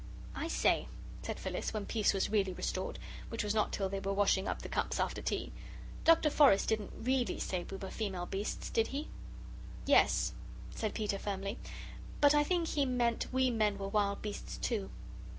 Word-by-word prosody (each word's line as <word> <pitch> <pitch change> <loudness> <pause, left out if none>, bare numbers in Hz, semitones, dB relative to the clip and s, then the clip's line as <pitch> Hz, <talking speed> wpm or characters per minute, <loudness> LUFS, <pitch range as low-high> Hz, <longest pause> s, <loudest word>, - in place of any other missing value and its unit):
"I 325 - -3
say," - - +2 0.3
said - - -4
Phyllis, - - -3
when 210 -2 -2
peace 215 -3 +2
was 195 0 0
really 195 -3 +2
restored, 185 +1 -3 0.3
which 230 -1 -2
was 210 0 0
not 215 -1 +1
till 195 - -1
they 195 +1 -3
were 195 0 -2
washing 200 -1 +3
up - - -3
the - - -5
cups - - -1
after - - -1
tea, - - -2 0.5
"Dr. 325 -2 +6
Forrest 275 -10 +5
didn't 215 -2 -1
REALLY 255 -1 +1
say 180 -2 -2
we 195 - -5
were 190 0 -6
female 195 -5 -3
beasts, 195 +3 -4
did 225 - +2
he?" 290 +3 -4 0.8
"Yes," - - +4 0.4
said 215 -2 -3
Peter, 205 -3 -1
firmly, 200 +2 -3 0.6
"but 290 0 +6
I 295 0 +5
think 340 +1 0
he 290 - +1
meant 245 -3 0
we 260 0 +3
men 215 -3 +1
were 195 0 -4
wild 200 -1 +1
beasts, 210 -1 -5
too." 210 -5 -2
210 Hz, 185 wpm, -33 LUFS, 195-250 Hz, 0.8 s, Dr